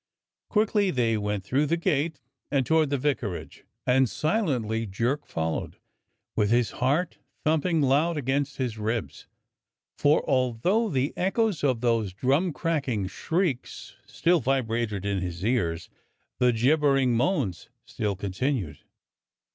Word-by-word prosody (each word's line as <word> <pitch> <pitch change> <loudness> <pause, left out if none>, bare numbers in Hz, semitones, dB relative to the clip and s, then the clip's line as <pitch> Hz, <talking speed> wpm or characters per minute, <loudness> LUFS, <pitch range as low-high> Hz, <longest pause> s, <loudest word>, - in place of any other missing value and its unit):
Quickly 210 -2 +2
they 120 -7 +1
went 105 -2 -2
through 135 +9 +1
the 170 - +1
gate 160 -3 0 0.3
and 135 -2 +1
toward 160 0 +3
the 140 - 0
vicarage, 125 -9 -3 0.2
and 130 0 +3
silently 125 - 0
Jerk 120 +9 -1
followed, 80 0 -3 0.6
with 105 -2 +2
his 120 0 +2
heart 145 +8 0 0.2
thumping 160 +1 +2
loud 150 +5 +2
against 140 +1 -1
his 120 -5 -3
ribs; 110 +1 -3 0.7
for 145 +1 +3
although 130 - +1
the 135 -2 0
echoes 195 -1 0
of 130 -5 +1
those 115 -6 +1
drum 140 - +1
cracking 140 - -1
shrieks 155 - -2
still 175 0 +2
vibrated 115 -7 -1
in 100 -1 0
his 90 +1 -4
ears, 85 -9 0 0.5
the 125 -1 +4
gibbering 135 +1 +3
moans 125 - 0 0.2
still 105 -2 -2
continued. 100 - -2
130 Hz, 125 wpm, -26 LUFS, 110-155 Hz, 0.7 s, the